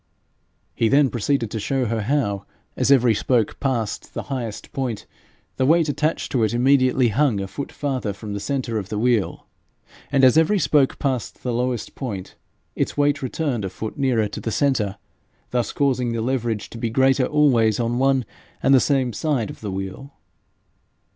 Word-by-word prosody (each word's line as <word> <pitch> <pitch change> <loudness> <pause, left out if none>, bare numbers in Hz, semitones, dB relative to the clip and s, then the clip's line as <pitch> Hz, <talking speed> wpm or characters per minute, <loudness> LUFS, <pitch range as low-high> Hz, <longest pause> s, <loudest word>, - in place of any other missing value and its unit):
He 115 - +1
then 140 0 +4
proceeded 120 -1 -1
to 110 - -3
show 130 +5 -1
her 115 -1 -1
how, 100 -5 -1 0.3
as - - 0
every 125 -4 +5
spoke 115 0 0
passed 120 -6 -2
the - - -3
highest 115 -5 -5
point, 125 -6 -3 0.5
the 130 - +2
weight 160 0 +4
attached 155 +2 -1
to 125 - +1
it 110 +2 +1
immediately 130 -1 +3
hung 125 -2 +2
a 95 - -3
foot 140 +8 -6
farther 130 -7 -2
from 100 +1 -7
the 100 - -3
centre 115 0 -2
of 100 -1 -7
the 105 - -3
wheel, 115 -2 0 0.7
and 135 -1 +3
as 130 +4 +7
every 165 +6 +3
spoke 145 -6 +2
passed 130 -4 -3
the 125 - -1
lowest 125 0 -2
point, 100 -9 -6 0.4
its - - -2
weight 145 0 +2
returned 130 -3 -2
a 95 - -2
foot 110 +3 -6
nearer 125 -6 +1
to 100 - -7
the - - -3
centre, 110 -6 0 0.5
thus 120 -2 0
causing 130 -4 0
the 115 - -2
leverage 115 -3 -2
to 115 - -8
be 115 - -1
greater 130 +2 +3
always 125 -8 +3
on 120 +1 0
one 135 -2 +2 0.4
and 135 - +5
the 135 - +7
same 130 -3 +1
side 130 -3 -1
of - - -13
the 105 - -4
wheel. 95 +9 -6
125 Hz, 180 wpm, -22 LUFS, 110-135 Hz, 0.7 s, as